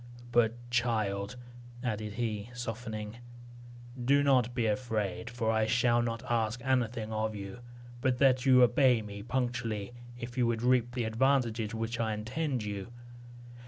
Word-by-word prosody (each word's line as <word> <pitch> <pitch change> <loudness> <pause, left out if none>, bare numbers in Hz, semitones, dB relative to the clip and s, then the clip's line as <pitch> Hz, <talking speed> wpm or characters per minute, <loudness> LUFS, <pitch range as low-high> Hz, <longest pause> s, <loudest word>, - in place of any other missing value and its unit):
But 120 -1 +3 0.2
child," 110 -3 0 0.5
added 105 -3 -2
he, 110 -1 -3
softening, 115 -2 -5 0.9
"do 140 +3 +4
not 125 -4 +3
be 120 -3 +1
afraid; 110 -1 -1
for 115 -2 -1
I 110 -1 +2
shall 120 0 +3
not 115 -1 -2
ask 115 0 0
anything 120 -4 0
of 110 0 -1
you, 100 +3 -7 0.4
but 130 -1 +2
that 130 -1 +4
you 130 -2 +7
obey 125 -1 +4
me 100 -1 -7
punctually, 120 -3 -2 0.2
if 120 +1 -6
you 120 - +3
would 115 0 -1
reap 125 -1 +3
the 125 - 0
advantages 115 -1 +1
which 115 +1 -3
I 110 -1 0
intend 125 +3 -2
you. 100 -2 -4
115 Hz, 145 wpm, -31 LUFS, 110-125 Hz, 0.9 s, you